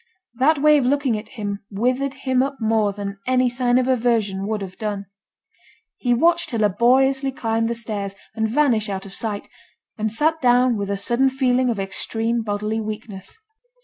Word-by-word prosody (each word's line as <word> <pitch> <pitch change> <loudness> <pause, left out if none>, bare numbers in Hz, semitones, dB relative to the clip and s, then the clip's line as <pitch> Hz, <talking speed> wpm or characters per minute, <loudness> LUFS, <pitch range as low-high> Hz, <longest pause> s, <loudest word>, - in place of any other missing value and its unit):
That 275 +6 +3
way 300 +1 +5
of 260 - -1
looking 275 -3 +1
at 215 +1 -12
him 205 -2 -3
withered 255 +6 -1
him 260 -1 +3
up 275 +1 -2
more 220 -2 +2
than 200 0 -6
any 255 0 +3
sign 245 0 +1
of 255 0 +1
aversion 225 -6 +1
would 215 -2 -2
have 185 -1 -8
done. 205 -2 -3 0.9
He 245 - -1
watched 335 +7 +3
her 235 - -2
laboriously 260 +6 +3
climb 225 -4 -1
the 235 - -2
stairs, 205 -4 -4 0.2
and 220 0 -1
vanish 235 -5 +2
out 195 -1 -4
of 195 - -11
sight; 215 -3 -4 0.5
and 215 0 -1
sat 315 +7 +1
down 250 -1 +4
with 200 -1 -3
a 200 - -1
sudden 240 +6 +2
feeling 255 -1 +1
of 225 -4 -1
extreme 225 +4 -1
bodily 210 +1 -2
weakness. 215 - -7
230 Hz, 180 wpm, -22 LUFS, 210-255 Hz, 0.9 s, way